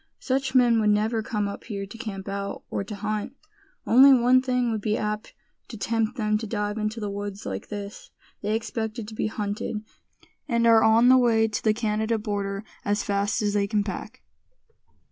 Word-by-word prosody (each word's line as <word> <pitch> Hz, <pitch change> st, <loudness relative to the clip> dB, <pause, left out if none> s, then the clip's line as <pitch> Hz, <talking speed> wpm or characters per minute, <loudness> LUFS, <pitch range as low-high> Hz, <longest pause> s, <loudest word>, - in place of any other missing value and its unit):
"Such 270 Hz, 0 st, -1 dB
men 240 Hz, -3 st, +5 dB
would 210 Hz, -, +3 dB
never 215 Hz, +2 st, +1 dB
come 210 Hz, -2 st, -2 dB
up 200 Hz, -, -7 dB
here 200 Hz, -4 st, -4 dB
to 205 Hz, +4 st, -11 dB
camp 200 Hz, -5 st, -6 dB
out, 200 Hz, 0 st, -4 dB
or -, -, -1 dB
to 205 Hz, +2 st, -7 dB
hunt. 210 Hz, +4 st, -3 dB, 0.5 s
Only 265 Hz, +4 st, +7 dB
one 255 Hz, 0 st, +5 dB
thing 250 Hz, -2 st, 0 dB
would 220 Hz, -2 st, -2 dB
be 215 Hz, +1 st, 0 dB
apt 210 Hz, 0 st, -4 dB, 0.3 s
to 225 Hz, -, -8 dB
tempt 225 Hz, +3 st, -1 dB
them 215 Hz, -2 st, +1 dB
to 220 Hz, -, -5 dB
dive 210 Hz, 0 st, -2 dB
into 215 Hz, +2 st, -2 dB
the 210 Hz, -, -3 dB
woods 205 Hz, 0 st, -6 dB
like 95 Hz, -1 st, -5 dB
this; 205 Hz, -1 st, -7 dB, 0.3 s
they 210 Hz, +1 st, 0 dB
expected 220 Hz, 0 st, -4 dB
to -, -, -10 dB
be 215 Hz, -, -1 dB
hunted, 210 Hz, +1 st, -3 dB, 0.6 s
and 235 Hz, -3 st, +1 dB
are 225 Hz, -1 st, +6 dB
on 225 Hz, +2 st, +5 dB
the 260 Hz, 0 st, +7 dB
way 225 Hz, -2 st, +3 dB
to 210 Hz, -2 st, -4 dB
the 215 Hz, -1 st, +3 dB
Canada 220 Hz, 0 st, 0 dB
border 200 Hz, -1 st, -3 dB, 0.2 s
as 205 Hz, +1 st, 0 dB
fast 200 Hz, +1 st, 0 dB
as 205 Hz, -1 st, 0 dB
they 200 Hz, -1 st, +1 dB
can 205 Hz, 0 st, +1 dB
pack." 210 Hz, +5 st, -7 dB
215 Hz, 195 wpm, -25 LUFS, 205-230 Hz, 0.6 s, Only